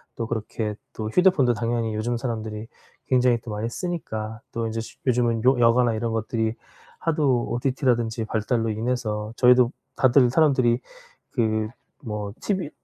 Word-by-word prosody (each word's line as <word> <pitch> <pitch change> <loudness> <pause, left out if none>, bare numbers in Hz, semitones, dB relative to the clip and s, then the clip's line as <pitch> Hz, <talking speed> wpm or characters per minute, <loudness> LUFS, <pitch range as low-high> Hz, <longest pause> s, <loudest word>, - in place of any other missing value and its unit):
또 115 - -3
그렇게 110 -1 -3 0.2
또 110 -1 -4
휴대폰도 145 - +4
당연히 115 -1 -1
요즘 115 +3 -1
사람들이 110 -2 -4 0.4
굉장히 125 -2 +3
또 120 - -8
많이 105 +2 -2
쓰니까 115 - -4
또 115 0 -2
인제 115 0 -2
쉬 115 - -11
요즘은 120 -3 +1
요 130 0 +4
여가나 120 0 +4
이런 115 +1 -2
것들이 110 0 -1 0.4
하도 145 -7 +1
OTT라든지 120 -3 0
발달로 115 +1 0
인해서 110 -2 -2
저희도 125 -1 +5 0.2
다들 130 -1 +5
사람들이 130 -5 +3 0.5
그 110 -3 0 0.3
뭐 105 -4 -4
TV 190 -7 -1
115 Hz, 325 characters per minute, -24 LUFS, 110-125 Hz, 0.5 s, 저희도